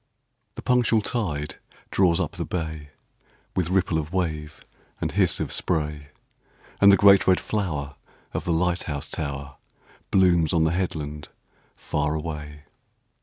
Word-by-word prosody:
The - - -8
punctual 120 -3 +3
tide 75 -12 -2 0.3
draws 90 -3 +3
up - - -1
the - - -4
bay, 80 -4 -4 0.7
With 90 -3 0
ripple 90 -3 +1
of 80 +1 -5
wave 80 -5 -3 0.3
and - - -2
hiss - - +2
of - - -2
spray, 75 -3 -1 0.7
And 100 0 +9
the 100 - +6
great 100 -1 +6
red 95 -1 +5
flower 75 -10 -3 0.4
of - - -2
the 85 - -1
light 90 +2 +1
house 70 -2 -4
tower 70 -2 -4 0.5
Blooms 85 -4 +3
on 80 -2 +3
the 80 - +2
headland 75 -5 -3 0.5
far 75 +1 -1
away. 75 -2 -6
80 Hz, 140 wpm, -25 LUFS, 75-95 Hz, 0.7 s, And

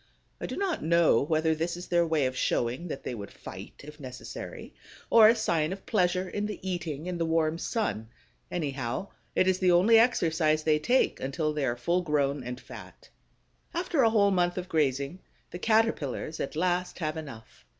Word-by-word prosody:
I - - -4
do - - -5
not 390 -4 -1
know 170 -6 +4
whether 160 +2 +1
this 165 +2 -2
is 175 - -7
their 170 -1 +3
way 155 -4 +1
of 130 0 -2
showing 125 +6 -1
that 145 - -6
they - - -4
would 100 -4 -7
fight, - - -10
if 150 +1 -11
necessary, 130 -2 -8 0.4
or 225 -2 +9
a 230 - +5
sign 170 -8 0
of 195 +1 -7
pleasure 185 -3 +1
in 205 +2 -3
the 210 - -6
eating 165 -3 -4
and 180 -1 -3
the 165 - +1
warm 160 0 +1
sun. 140 - -2 0.4
Anyhow, 140 0 -3 0.3
it 185 - +3
is 185 -1 +2
the 185 -1 +4
only 205 +6 +6
exercise 160 -9 +2
they 155 -1 +3
take 245 +12 +2
until 150 +3 -2
they 150 -2 -1
are 120 -1 -1
full 170 +9 +1
grown 145 -4 0
and 125 +1 -6
fat. - - -12 0.7
After 340 -4 +1
a 230 - +5
whole 205 -2 +3
month 175 -1 +1
of 180 0 -4
grazing, 140 +1 0 0.3
the 175 - -6
Caterpillars 215 - 0
at 140 - -4
last 180 +2 0
have 155 -2 -2
enough. 140 -9 -10
165 Hz, 190 wpm, -28 LUFS, 145-185 Hz, 0.7 s, or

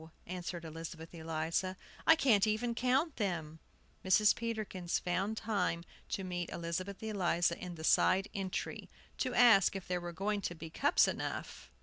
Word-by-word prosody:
answered 175 -1 -5
Elizabeth 165 +1 -8
Eliza. 165 +3 -2 0.3
"I 325 - +9
can't 225 -9 +4
even 225 +3 0
count 260 +6 +1
them." 165 -7 -2 0.4
Mrs. 205 +3 +5
Peterkin 215 -6 -4
found 190 +5 0
time 200 -6 -1 0.3
to 195 - -2
meet 175 -2 -3
Elizabeth 180 +4 -4
Eliza 175 -5 +1
in 180 -1 -7
the 160 - -9
side 190 +4 +4
entry, 190 -2 -4 0.3
to 255 - -1
ask 225 -6 +6
if 195 - -6
there 180 0 -1
were 175 0 -5
going 200 +4 -1
to 175 - -3
be 160 0 -9
cups - - +4
enough. - - -4
185 Hz, 150 wpm, -34 LUFS, 170-215 Hz, 0.4 s, I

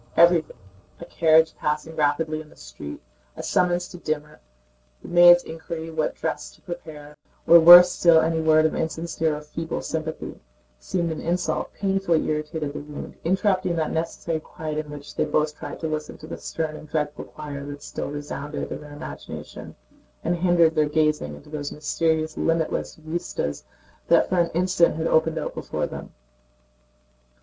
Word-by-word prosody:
Everything: 170 -5 +4 0.4
a - - -8
carriage 160 0 +3
passing 150 +2 -2
rapidly 155 +1 0
in 155 - -14
the - - -19
street, - - -9 0.4
a - - -6
summons 180 -1 +1
to 180 - -10
dinner, 150 -2 -4 0.6
the - - -9
maid's 175 0 +7
inquiry 160 0 -7
what 160 -1 -1
dress - - -3
to - - -25
prepare, 150 -4 -9 0.3
or 170 - +9
worse 175 +2 +10
still 170 -2 +5
any 160 0 +1
word 155 0 +4
of 160 - +1
insincere 160 -1 -1
or 150 - -7
feeble 160 +2 -5
sympathy, 160 0 -5 0.4
seemed 170 - -2
an 160 - -5
insult, 175 +2 -1
painfully 195 -4 +1
irritated 150 -1 -2
the - - -5
wound, 150 0 -8
interrupting 185 0 +1
that 160 -2 -1
necessary 165 0 -2
quiet 155 0 -5
in 150 - -15
which 145 0 -10
they - - +1
both 150 0 0
tried - - -8
to 160 - -2
listen 155 -1 -4
to - - -11
the 160 - -6
stern 160 -1 -3
and 155 0 -11
dreadful 150 -1 -2
choir 145 -2 -8
that 145 0 -8
still - - -5
resounded 145 0 -5
in - - -5
their 150 -1 -11
imagination, 145 - -9 0.5
and 175 - 0
hindered 170 -2 +4
their 155 -2 +2
gazing 155 0 +1
into 150 - -15
those 145 -2 -4
mysterious 155 +1 -1
limitless 165 -1 -1
vistas 155 - -4 0.4
that - - +4
for 185 - +1
an 170 -1 +2
instant 175 -2 +3
had 160 +1 -2
opened 160 0 +2
out - - -3
before - - -3
them. - - -8
160 Hz, 170 wpm, -24 LUFS, 150-170 Hz, 0.6 s, worse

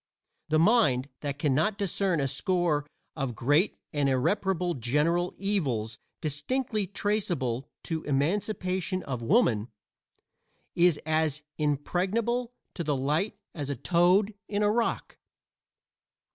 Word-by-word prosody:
The 155 - +3
mind 155 - +4
that 140 -1 -4
can 145 -1 +1
not 180 +10 +1
discern 195 -3 0
a 135 - +1
score 170 -2 0 0.3
of 135 -6 -3
great 145 - +2 0.2
and 145 -2 +2
irreparable 180 +6 +1
general 150 +8 +1
evils 135 - -1 0.2
distinctly 210 - -1
traceable 175 - -1
to 160 -1 -2
"emancipation 185 +4 -1
of 125 -3 -4
woman" 115 - +3 1.1
is 170 -3 +4
as 155 -2 0 0.2
impregnable 195 - 0 0.2
to 170 - -4
the 150 -2 0
light 150 +10 0 0.2
as 145 -4 -4
a 140 - -1
toad 180 - +3
in 205 0 0
a 205 - +4
rock. 230 +1 -1
165 Hz, 115 wpm, -28 LUFS, 140-200 Hz, 1.1 s, mind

